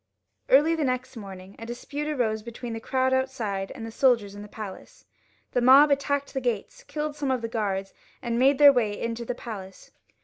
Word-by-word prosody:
Early 295 Hz, +5 st, +5 dB
the 320 Hz, -2 st, 0 dB
next 255 Hz, 0 st, -2 dB
morning 195 Hz, -3 st, -10 dB
a 225 Hz, -, -7 dB
dispute 280 Hz, +5 st, -5 dB
arose 235 Hz, -7 st, 0 dB
between 235 Hz, +1 st, -7 dB
the 225 Hz, -, -4 dB
crowd 260 Hz, +3 st, 0 dB
outside 230 Hz, -8 st, -1 dB
and 230 Hz, -4 st, -7 dB
the 225 Hz, -, -7 dB
soldiers 230 Hz, -5 st, +2 dB
in 205 Hz, -, -9 dB
the 210 Hz, -, -9 dB
palace. 205 Hz, -2 st, -10 dB, 0.5 s
The 245 Hz, -, +1 dB
mob 275 Hz, +4 st, +7 dB
attacked 280 Hz, 0 st, 0 dB
the 265 Hz, -, -2 dB
gates, 240 Hz, -5 st, -3 dB
killed 300 Hz, -1 st, -4 dB
some 285 Hz, -2 st, -2 dB
of 255 Hz, -3 st, 0 dB
the -, -, -1 dB
guards, 200 Hz, -4 st, -2 dB, 0.3 s
and 235 Hz, -1 st, -2 dB
made 270 Hz, +2 st, +4 dB
their 285 Hz, -1 st, +8 dB
way 215 Hz, -5 st, 0 dB
into 230 Hz, 0 st, -3 dB
the 245 Hz, -, -3 dB
palace. 195 Hz, -6 st, -9 dB
240 Hz, 200 wpm, -26 LUFS, 215-270 Hz, 0.5 s, their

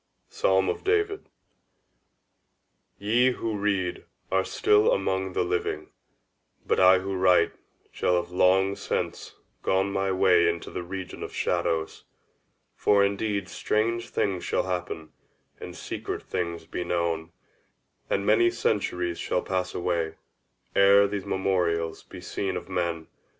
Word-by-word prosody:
_ -, -, -29 dB
—Psalm 95 Hz, 0 st, +2 dB
of -, -, -2 dB
David. 415 Hz, 0 st, 0 dB, 1.7 s
Ye 120 Hz, +5 st, +3 dB
who 115 Hz, -2 st, -3 dB
read 100 Hz, -3 st, -1 dB, 0.3 s
are 95 Hz, 0 st, +3 dB
still 105 Hz, +2 st, +3 dB
among 95 Hz, -1 st, 0 dB
the -, -, +1 dB
living; 90 Hz, 0 st, -2 dB, 0.7 s
but -, -, +1 dB
I 95 Hz, 0 st, +7 dB
who 95 Hz, +1 st, -3 dB
write 90 Hz, -1 st, +4 dB, 0.4 s
shall 90 Hz, -, +1 dB
have 90 Hz, 0 st, -1 dB
long 95 Hz, +2 st, +3 dB
since -, -, -4 dB, 0.3 s
gone 95 Hz, +1 st, +1 dB
my 95 Hz, 0 st, 0 dB
way 90 Hz, -2 st, +4 dB
into 85 Hz, 0 st, -4 dB
the -, -, -4 dB
region 95 Hz, +1 st, -7 dB
of -, -, -6 dB
shadows. 80 Hz, -1 st, -1 dB, 0.7 s
For 100 Hz, -1 st, +4 dB
indeed 100 Hz, -1 st, -1 dB
strange 115 Hz, +5 st, -1 dB
things 95 Hz, -3 st, -1 dB
shall -, -, 0 dB
happen, 90 Hz, -3 st, -4 dB, 0.5 s
and -, -, -8 dB
secret -, -, -5 dB
things 85 Hz, -2 st, -3 dB
be 90 Hz, -, -4 dB
known, 85 Hz, -1 st, -1 dB, 0.8 s
and 100 Hz, -, 0 dB
many 115 Hz, +3 st, +5 dB
centuries 90 Hz, -7 st, -1 dB
shall 90 Hz, -, -1 dB
pass 90 Hz, -1 st, -2 dB
away, 85 Hz, -2 st, -1 dB, 0.6 s
ere 100 Hz, +1 st, +6 dB
these 100 Hz, -1 st, -4 dB
memorials 85 Hz, -4 st, 0 dB
be -, -, -11 dB
seen 95 Hz, -2 st, -3 dB
of -, -, -7 dB
men. 85 Hz, -3 st, -2 dB
95 Hz, 135 wpm, -26 LUFS, 90-100 Hz, 1.7 s, I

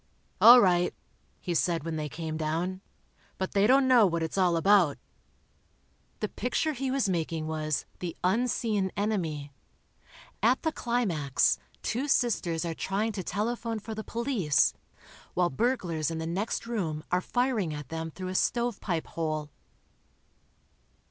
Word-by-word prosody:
"All 245 Hz, +2 st, +11 dB
right," 180 Hz, -4 st, +3 dB, 0.4 s
he 175 Hz, -, -3 dB
said 170 Hz, -1 st, +1 dB
when 165 Hz, 0 st, -3 dB
they 150 Hz, -1 st, -3 dB
came 160 Hz, +1 st, -5 dB
down, 165 Hz, +4 st, -2 dB, 0.6 s
"but 190 Hz, -, -3 dB
they 200 Hz, +1 st, +3 dB
don't 265 Hz, +2 st, +5 dB
know 245 Hz, -5 st, +6 dB
what 170 Hz, -2 st, -1 dB
it's 160 Hz, -, -3 dB
all 180 Hz, -3 st, +3 dB
about." 185 Hz, -4 st, +4 dB, 1.2 s
The -, -, 0 dB
picture 310 Hz, -1 st, -1 dB
he 265 Hz, 0 st, -3 dB
was 265 Hz, -4 st, +1 dB
making 165 Hz, -3 st, -2 dB
was 155 Hz, -1 st, -2 dB
"The 175 Hz, -2 st, -5 dB
Unseen 210 Hz, -1 st, +1 dB
Enemy." 165 Hz, -9 st, -2 dB, 0.9 s
At 240 Hz, +5 st, +3 dB
the 320 Hz, -, +1 dB
climax, 200 Hz, -, +1 dB, 0.2 s
two 260 Hz, +5 st, -1 dB
sisters 175 Hz, -, +1 dB
are 165 Hz, -, -2 dB
trying 200 Hz, +6 st, -1 dB
to 200 Hz, -3 st, -4 dB
telephone 230 Hz, +4 st, -2 dB
for 220 Hz, +1 st, -6 dB
the 215 Hz, 0 st, -5 dB
police, 230 Hz, -, +1 dB, 0.6 s
while 175 Hz, -2 st, +2 dB
burglars 170 Hz, -, 0 dB
in 165 Hz, -, -4 dB
the 160 Hz, -, -3 dB
next 195 Hz, +8 st, -2 dB
room 170 Hz, -10 st, -3 dB
are 180 Hz, 0 st, +2 dB
firing 245 Hz, -7 st, 0 dB
at 150 Hz, -3 st, -7 dB
them 165 Hz, 0 st, -4 dB
through 185 Hz, +3 st, -6 dB
a -, -, -4 dB
stove 235 Hz, +3 st, 0 dB
pipe 170 Hz, -5 st, -2 dB
hole. 155 Hz, -2 st, -3 dB
185 Hz, 150 wpm, -28 LUFS, 160-230 Hz, 1.2 s, All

